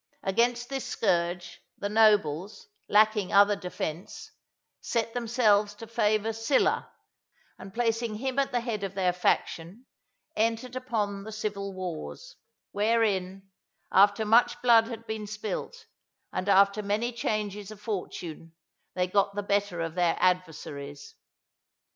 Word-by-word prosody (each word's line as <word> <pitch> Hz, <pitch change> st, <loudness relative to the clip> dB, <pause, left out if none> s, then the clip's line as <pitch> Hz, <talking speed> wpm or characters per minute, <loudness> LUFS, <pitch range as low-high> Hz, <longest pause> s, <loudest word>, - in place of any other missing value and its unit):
Against 240 Hz, +4 st, +1 dB
this 270 Hz, -1 st, -3 dB
scourge, 175 Hz, -3 st, -1 dB, 0.2 s
the 200 Hz, -, -3 dB
nobles, 205 Hz, -, +2 dB, 0.2 s
lacking 210 Hz, -2 st, +3 dB
other 205 Hz, +1 st, +6 dB
defence, 180 Hz, -3 st, -6 dB, 0.5 s
set 230 Hz, -1 st, -2 dB
themselves 215 Hz, -4 st, +2 dB
to 225 Hz, -, -9 dB
favour 220 Hz, -1 st, +1 dB
Sylla, 225 Hz, +5 st, +1 dB, 0.7 s
and 195 Hz, -, -10 dB
placing 230 Hz, 0 st, -1 dB
him 265 Hz, +4 st, -2 dB
at 275 Hz, -, +1 dB
the 245 Hz, -, 0 dB
head 225 Hz, -4 st, -3 dB
of 195 Hz, 0 st, -4 dB
their 185 Hz, -2 st, +1 dB
faction, 180 Hz, +4 st, -1 dB, 0.5 s
entered 230 Hz, +3 st, -1 dB, 0.2 s
on 205 Hz, -3 st, -1 dB
the 220 Hz, -, -8 dB
civil 205 Hz, -2 st, -4 dB
wars; 185 Hz, -, -6 dB, 0.4 s
wherein, 195 Hz, -3 st, 0 dB, 0.4 s
after 205 Hz, +2 st, +5 dB
much 230 Hz, +3 st, +4 dB
blood 230 Hz, -2 st, +6 dB
had 230 Hz, -1 st, -8 dB
been 220 Hz, -1 st, -5 dB
spilt, 215 Hz, -, -5 dB, 0.5 s
and 185 Hz, -, -2 dB
after 200 Hz, +1 st, +5 dB
many 210 Hz, +4 st, -1 dB
changes 210 Hz, -3 st, -3 dB
of 215 Hz, -2 st, -10 dB
fortune, 175 Hz, -6 st, -6 dB, 0.4 s
they 180 Hz, 0 st, +1 dB
got 200 Hz, +2 st, +1 dB
the 205 Hz, -, -2 dB
better 200 Hz, -3 st, 0 dB
of 165 Hz, -1 st, -3 dB
their 175 Hz, -1 st, +1 dB
adversaries. 150 Hz, -6 st, -2 dB
205 Hz, 130 wpm, -28 LUFS, 185-225 Hz, 0.7 s, other